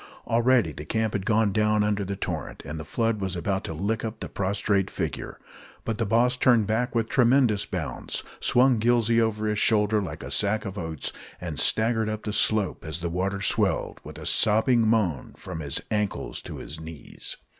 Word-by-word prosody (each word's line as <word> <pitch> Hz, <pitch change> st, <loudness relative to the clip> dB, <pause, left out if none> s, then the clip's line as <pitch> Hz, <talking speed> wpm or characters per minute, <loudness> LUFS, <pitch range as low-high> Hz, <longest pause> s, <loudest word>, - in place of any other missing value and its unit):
Already 120 Hz, -6 st, +3 dB
the 75 Hz, +1 st, -8 dB
camp 110 Hz, +7 st, -1 dB
had 100 Hz, -1 st, -3 dB
gone 110 Hz, -2 st, +3 dB
down 105 Hz, +1 st, +2 dB
under 105 Hz, -1 st, 0 dB
the 100 Hz, +1 st, -3 dB
torrent, 85 Hz, -7 st, -5 dB
and 75 Hz, +2 st, -5 dB
the -, -, -5 dB
flood 115 Hz, +5 st, -1 dB
was 95 Hz, -1 st, -2 dB
about 95 Hz, +3 st, -1 dB
to -, -, -4 dB
lick 105 Hz, +7 st, -1 dB
up 110 Hz, 0 st, -5 dB
the -, -, -5 dB
prostrate 100 Hz, 0 st, 0 dB
figure; 80 Hz, -7 st, -4 dB, 0.5 s
but 115 Hz, -1 st, -2 dB
the 115 Hz, -, 0 dB
boss 120 Hz, +3 st, +3 dB
turned 120 Hz, -3 st, +4 dB
back 115 Hz, +4 st, -1 dB
with 115 Hz, -1 st, +1 dB
tremendous 120 Hz, -5 st, +3 dB
bounds, 80 Hz, -9 st, -4 dB, 0.2 s
swung 125 Hz, -1 st, +4 dB
Gillsey 115 Hz, 0 st, +3 dB
over 110 Hz, -1 st, 0 dB
his 105 Hz, -1 st, 0 dB
shoulder 105 Hz, -1 st, +3 dB
like 95 Hz, -, -6 dB
a -, -, -7 dB
sack 110 Hz, +2 st, +1 dB
of 95 Hz, -1 st, -5 dB
oats, 80 Hz, -6 st, -3 dB, 0.3 s
and 85 Hz, -4 st, -5 dB
staggered 110 Hz, 0 st, +2 dB
up 110 Hz, 0 st, -4 dB
the 105 Hz, -, -3 dB
slope, 105 Hz, -3 st, +1 dB
as 80 Hz, +2 st, -5 dB
the 85 Hz, -, -2 dB
water 95 Hz, +3 st, -1 dB
swelled, -, -, +1 dB
with -, -, -9 dB
a -, -, -8 dB
sobbing 110 Hz, +2 st, +4 dB
moan, 100 Hz, -, 0 dB
from 80 Hz, -, -7 dB
his 70 Hz, -4 st, 0 dB
ankles 105 Hz, -2 st, -2 dB
to -, -, -8 dB
his 75 Hz, +2 st, -8 dB
knees. 80 Hz, -1 st, -8 dB
105 Hz, 195 wpm, -26 LUFS, 95-115 Hz, 0.5 s, turned